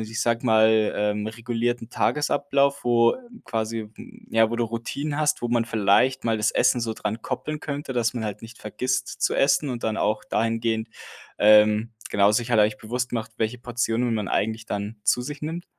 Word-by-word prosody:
ich 110 +1 -3
sage 115 +1 0
mal, 110 -1 +4
ähm, 105 0 -1
regulierten 115 +1 -3
Tagesablauf, 140 0 +1
wo 120 -1 +4 0.3
quasi 110 -1 -3 0.4
ja, 115 0 +4
wo 115 - -3
du 120 - +1
Routinen 140 +6 -4
hast, 150 -2 +1
wo 120 - -1
man 120 -1 +1
vielleicht 115 +4 +2
mal 115 -1 +1
das 105 +1 +2
Essen 125 - +3
so 115 -1 -2
dran 110 +2 -4
koppeln 155 +6 -4
könnte, 145 -3 -5
dass 120 -2 0
man 115 -3 -3
halt 105 -2 -5
nicht 115 +1 -11
vergisst 125 +4 -3
zu - - +1
essen 140 +1 +2
und 120 -2 -4
dann 110 -1 -1
auch 105 0 0
dahingehend, 115 0 -1 0.5
ähm, 105 +1 +5 0.2
genau, 100 0 +4
sich 115 +3 0
hat 115 - +3
eigentlich 105 0 +2
bewusst 125 +3 -3
gemacht, 115 -2 -4
welche 110 +2 -2
Portionen 120 0 -1
man 105 -3 -2
eigentlich 110 +1 -1
dann 105 +2 -4
zu 110 +3 +2
sich 145 +4 -7
nimmt? 165 +3 -4
115 Hz, 185 wpm, -24 LUFS, 110-125 Hz, 0.5 s, ähm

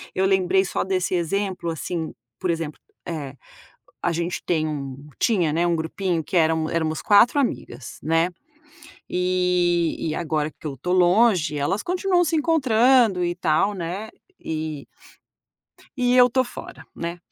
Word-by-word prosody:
Eu 190 - +2
lembrei 190 0 +3
só 190 - -2
desse 190 -1 -1
exemplo, 185 +1 -2
assim, 165 0 -4 0.3
por 185 - -2
exemplo, 165 -2 -4 0.3
eh, 145 -6 -5 0.7
a 170 - +1
gente 170 +1 -2
tem 160 -3 +1
um 140 -2 -6
tinha, 180 -10 +2
né, 170 +2 +1
um 170 - +2
grupinho 165 +1 -2
que 170 - -6
eram 160 -1 +2
éramos 160 -1 -1
4 215 +6 +5
amigas, 245 - -4
né, 165 +2 +2 0.8
e 180 -2 +1
e 155 - -2
agora 155 -2 -1
que 155 - -9
eu 145 - -4
estou 180 +8 -2
longe, 180 -3 +3
elas 175 +9 0
continuam 360 0 +1
se 325 +1 0
encontrando 255 - +3
e 175 - 0
tal, 180 +4 +1
né, 190 +5 -5 0.3
e 155 -2 -4 1.1
e 250 -1 +2
eu 250 -1 +8
estou 255 +1 +1
fora, 245 - -10
né, 170 +1 -5
175 Hz, 150 wpm, -23 LUFS, 160-200 Hz, 1.1 s, eu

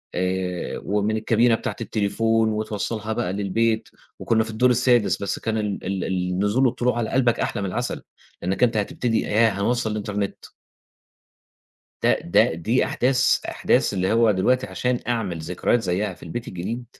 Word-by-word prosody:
آآ 90 0 -2
ومن 105 +2 0
الكابينة 115 +2 +3
بتاعة - - -4
التليفون 110 +1 +1
وتوصّلها 110 0 -3
بقى 90 -4 -2
للبيت، 110 +3 0 0.3
وكنا 110 -1 +2
في 110 - -8
الدور 110 +3 +2
السادس 120 -2 +3
بس 100 - -2
كان 110 0 -2
ال 105 -2 -3
ال 95 -1 -2
النزول 95 +7 0
والطلوع 125 0 +1
على 115 -2 -1
قلبك 125 -3 +2
أحلى - - -1
من 100 - -2
العسل، 120 +6 -3 0.4
لإنك 95 +7 0
أنت 115 -2 +3
هتبتدي 120 +1 0
ياه 115 +2 +3
هنوصّل 110 +3 -1
الانترنت 105 -1 -3 1.6
ده، - - +3
ده - - +4
دي 110 +10 +1
أحداث، 130 0 +2
أحداث - - +1
اللي 95 +1 0
هو 115 0 +4
دلوقتي 125 +7 +2
عشان 125 -1 -1
أعمل 105 -8 -1
ذكريات 90 +8 0
زيّها 95 +1 -1
في - - -23
البيت 115 +8 -6
الجديد. 115 +8 -5
110 Hz, 155 wpm, -23 LUFS, 100-120 Hz, 1.6 s, ده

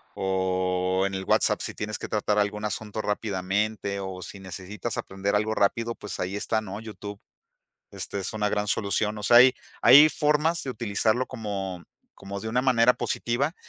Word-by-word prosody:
o 95 -1 0
en 100 - -6
el 95 - -3
WhatsApp, - - +2
si - - -4
tienes 105 +1 -4
que - - -5
tratar 105 0 0
algún 105 +1 -1
asunto 105 +1 -3
rápidamente 105 0 -2
o 95 -1 -6
si 100 - -8
necesitas 95 +4 -6
aprender 95 +1 -2
algo 105 +1 +1
rápido, 115 +3 +1
pues, 105 -2 -7
ahí 95 +2 -2
está, 110 +1 0
¿no? 100 -1 -7
YouTube. 105 -2 -8 0.7
Este 100 - -4
es 95 - -3
una 105 -1 0
gran 105 0 -1
solución. 105 +1 0
O - - -8
sea, 120 +4 +6
hay 125 +1 +8 0.3
hay 145 +3 +9
formas 150 +3 +1
de 135 - -4
utilizarlo 115 +2 0
como 100 -7 -5 0.3
como 100 0 -7
de 110 - -5
una 125 +3 +1
manera 125 -2 +5
positiva 135 +7 -1
105 Hz, 175 wpm, -26 LUFS, 95-115 Hz, 0.7 s, hay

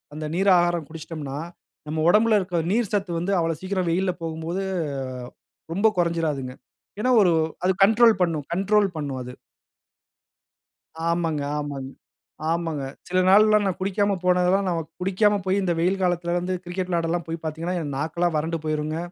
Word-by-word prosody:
அந்த 155 0 -5
நீர் 195 +2 +2
ஆகாரம் 175 -3 +1
குடுச்சுட்டோம்னா, 155 -3 -7 0.5
நம்ம 155 +1 -3
உடம்பில 215 +2 +5
இருக்குற 180 -3 -1
நீர் 225 -1 +1
சத்து 200 -3 0
வந்து, 195 +3 -1
அவ்வளவு 165 -2 -1
சீக்கிரம் 185 -2 -1
வெயில்ல 185 +2 +1
போகும்போது, 165 +3 -3 1.1
ரொம்ப 200 +6 +2
கொறஞ்சுடாதுங்க. 160 -7 -1 0.5
ஏனா, 255 - +1
ஒரு 180 -3 +4 0.3
அது 185 - +4
கண்ட்ரோல் 225 +1 +5
பண்ணும் 160 -5 -1
கண்ட்ரோல் 200 +2 +2
பண்ணும், 140 -4 -4
அது. 125 - -8 1.8
ஆமாங்க. 165 -3 0 0.2
ஆமாங் 140 -2 -5 0.6
ஆமாங்க. 165 -3 -1 0.3
சில 185 - +1
நாள்லாம் 210 +2 +6
நான் 190 - -1
குடிக்காம 200 +1 +1
போனதெல்லாம், 180 +2 +3
நம்ம 170 -2 0 0.2
குடிக்காம 195 +3 +2
போயி, 190 +1 +2
இந்த 180 -2 +1
வெயில் 185 +3 +1
காலத்தில 175 -1 0
வந்து 180 +1 -3
கிரிக்கெட் 180 +1 -4
விளையாடலாம் 170 0 -1
போய் 165 0 -5
பாத்தீங்கனா, 160 +3 -3
என் 145 -3 -4
நாக்கெல்லாம் 160 +4 -1
வறண்டு 165 +2 -1
போய்ரும்ங்க. 155 0 -2
175 Hz, 150 wpm, -24 LUFS, 160-190 Hz, 1.8 s, நாள்லாம்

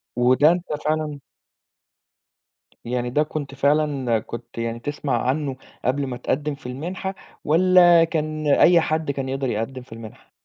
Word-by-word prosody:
وده 130 +6 +4
أنت 175 0 -2 0.2
فعلًا 155 -2 -1 1.7
يعني 120 0 -2
ده 150 +4 +2
كنت 145 -3 -6
فعلًا 140 -4 +1
كنت 115 +2 -10
يعني 115 0 -3
تسمع 140 -3 -2
عنه 140 -1 -1 0.3
قبل 135 +2 0
ما 125 -1 -5
تقدِّم 145 +3 -2
في 140 - -17
المنحة 180 +9 -5 0.3
والَّا 175 +1 +6
كان 155 -2 -2
أي 170 +4 +5
حد 155 -2 -1
كان 135 -1 -4
يقدر 135 -1 -2
يقدِّم 115 +4 -3
في 125 -2 -13
المنحة؟ 115 -2 -12
140 Hz, 145 wpm, -22 LUFS, 125-155 Hz, 1.7 s, والَّا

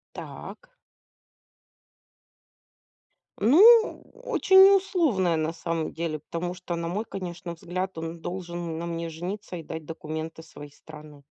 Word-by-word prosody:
Так. - - -9 2.7
Ну, 425 - +6
очень 390 -6 +5
не 395 - +8
условная 310 - +2
на 160 +1 -1
самом 165 -1 -3
деле, 160 -2 -3
потому 175 +4 -4
что, 180 -1 -5
на 170 0 -3
мой, 205 +6 -3
конечно, 175 -2 -6
взгляд, 185 +2 -5
он 165 +1 -5
должен 175 -2 -5
на 170 - -4
мне 165 -1 -4
жениться 180 +4 -6
и 165 - -8
дать 160 0 -7
документы 160 0 -6
своей 145 -2 -12
страны. 150 -1 -14
170 Hz, 125 wpm, -26 LUFS, 160-190 Hz, 2.7 s, не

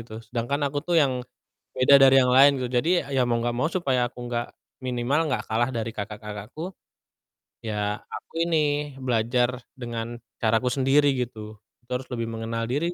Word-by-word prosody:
gitu, 110 -1 -9
sedangkan 120 +6 -2
aku 145 - -1
tuh 170 +3 0
yang 135 -5 +3 0.5
beda 135 +2 +6
dari 135 0 +7
yang 125 - +3
lain 140 +2 +8
gitu, 125 - -2
jadi 170 +6 +2
ya 130 - +4
mau 120 -1 0
nggak 120 0 -1
mau 130 - +1
supaya 130 -9 +1
aku - - -17
nggak 120 0 -2 0.4
minimal 125 +3 0
nggak - - 0
kalah 120 +3 +1
dari 115 -1 -2
kakak-kakakku, 105 - -7 0.9
ya 105 -1 -1 0.2
aku - - -8
ini, 170 -1 +1 0.4
belajar 120 0 +1 0.2
dengan 120 -1 -6 0.2
caraku 115 +2 +1
sendiri 135 +3 +3
gitu. 110 -3 -5 0.2
Itu 120 - -23
harus 125 +1 -4
lebih 115 -1 -2
mengenal 115 0 -3
diri 165 +7 0
120 Hz, 165 wpm, -25 LUFS, 115-135 Hz, 0.9 s, lain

